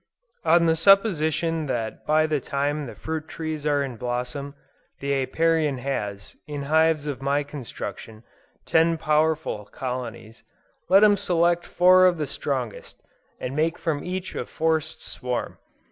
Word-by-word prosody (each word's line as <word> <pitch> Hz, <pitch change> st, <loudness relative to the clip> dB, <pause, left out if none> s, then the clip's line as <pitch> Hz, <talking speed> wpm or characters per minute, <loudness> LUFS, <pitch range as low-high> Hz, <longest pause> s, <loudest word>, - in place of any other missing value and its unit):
On 170 Hz, 0 st, +4 dB
the 160 Hz, -1 st, +3 dB
supposition 165 Hz, -4 st, +3 dB
that 115 Hz, -4 st, -4 dB
by 155 Hz, +1 st, +4 dB
the 155 Hz, -2 st, 0 dB
time 145 Hz, +2 st, -2 dB
the -, -, -9 dB
fruit 160 Hz, -1 st, -5 dB
trees 155 Hz, -2 st, -4 dB
are 145 Hz, -1 st, +2 dB
in 130 Hz, -4 st, -6 dB
blossom, 125 Hz, +4 st, -4 dB, 0.4 s
the 140 Hz, 0 st, -1 dB
Apiarian 150 Hz, +2 st, +1 dB
has, 105 Hz, -7 st, -4 dB
in 145 Hz, -1 st, -4 dB
hives 160 Hz, +1 st, +2 dB
of 140 Hz, -3 st, -4 dB
my 140 Hz, +2 st, +1 dB
construction, 120 Hz, -5 st, -8 dB, 0.4 s
ten 165 Hz, 0 st, +3 dB
powerful 155 Hz, -7 st, 0 dB
colonies, 120 Hz, -1 st, -6 dB, 0.5 s
let 195 Hz, +3 st, +7 dB
him 205 Hz, -1 st, +6 dB
select 175 Hz, -1 st, +1 dB
four 185 Hz, +1 st, +6 dB
of 175 Hz, -2 st, +2 dB
the 155 Hz, -, -1 dB
strongest, 130 Hz, -5 st, -4 dB, 0.4 s
and 130 Hz, -, -4 dB
make 160 Hz, +3 st, +1 dB
from 150 Hz, -3 st, -2 dB
each 185 Hz, +1 st, -4 dB
a -, -, -4 dB
forced 160 Hz, 0 st, -1 dB
swarm. 125 Hz, -1 st, -4 dB
150 Hz, 145 wpm, -24 LUFS, 135-165 Hz, 0.5 s, let